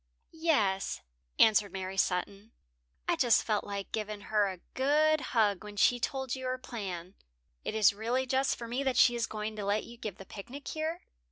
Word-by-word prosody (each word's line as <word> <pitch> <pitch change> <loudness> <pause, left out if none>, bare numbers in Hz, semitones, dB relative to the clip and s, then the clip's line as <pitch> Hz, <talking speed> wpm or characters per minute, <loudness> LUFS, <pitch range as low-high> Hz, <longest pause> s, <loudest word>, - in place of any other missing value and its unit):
"Yes," 275 - +1 0.4
answered 210 -2 +5
Mary 190 0 -5
Sutton, 195 +4 -1 0.5
"I - - +3
just 240 -3 +4
felt 210 -2 0
like 200 -1 -5
giving 215 -1 -3
her 210 -1 +4
a 185 - -6 0.2
good 305 +3 +3
hug 210 -7 +1
when 210 -1 -9
she 245 +4 +4
told 265 0 -2
you 260 -1 -4
her 255 0 -1
plan. 195 -8 -6 0.5
It - - -3
is 210 -2 +5
really 235 +5 -1
just 265 +1 +1
for 235 - -6
me 245 +4 -2
that 265 -2 0
she 240 - +6
is 235 -2 -1
going 215 0 -4
to 210 - -3
let 205 +2 +1
you 235 0 -11
give 215 -5 -6
the 195 - -10
picnic 245 +10 -8
here." 315 +2 -3
220 Hz, 190 wpm, -31 LUFS, 200-260 Hz, 0.5 s, she